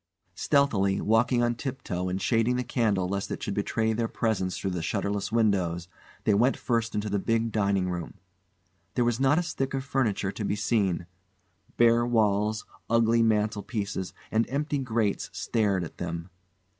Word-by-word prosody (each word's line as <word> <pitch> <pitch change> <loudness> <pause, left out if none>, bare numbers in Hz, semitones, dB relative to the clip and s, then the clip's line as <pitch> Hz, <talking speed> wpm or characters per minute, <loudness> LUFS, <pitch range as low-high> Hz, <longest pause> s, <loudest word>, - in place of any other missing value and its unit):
Stealthily, 105 -9 +2
walking 120 +3 +3
on 120 0 +2
tip 130 +2 -5
toe 90 0 -2
and 90 +1 -2
shading 115 +3 +2
the 125 - 0
candle 110 -7 +1
lest 100 +1 -2
it - - -5
should 100 - -2
betray 110 +2 0
their 115 +1 0
presence 105 -6 -1
through 95 - -2
the 90 -2 -2
shutterless 100 +4 -2
windows, 95 -7 +1 0.4
they 105 - +3
went 120 +7 +3
first 115 -2 -1
into 105 0 -1
the 100 -1 0
big 115 +2 0
dining 100 -3 +1
room. 85 -2 -4 0.8
There 120 - +2
was 120 0 +1
not 135 +3 +4
a 175 - +2
stick 135 -5 -2
of 135 - -2
furniture 115 -8 0
to 105 - -5
be 100 - 0
seen. 100 -5 0 0.7
Bare 120 0 +5
walls, 110 -2 +1 0.2
ugly 115 0 +4
mantel 110 -1 +2
pieces 100 -4 -3 0.2
and 110 +1 +1
empty 145 +2 -1
grates 115 -5 -1
stared 100 -5 0
at 85 - -9
them. 85 +1 -5
110 Hz, 170 wpm, -27 LUFS, 100-120 Hz, 0.8 s, Bare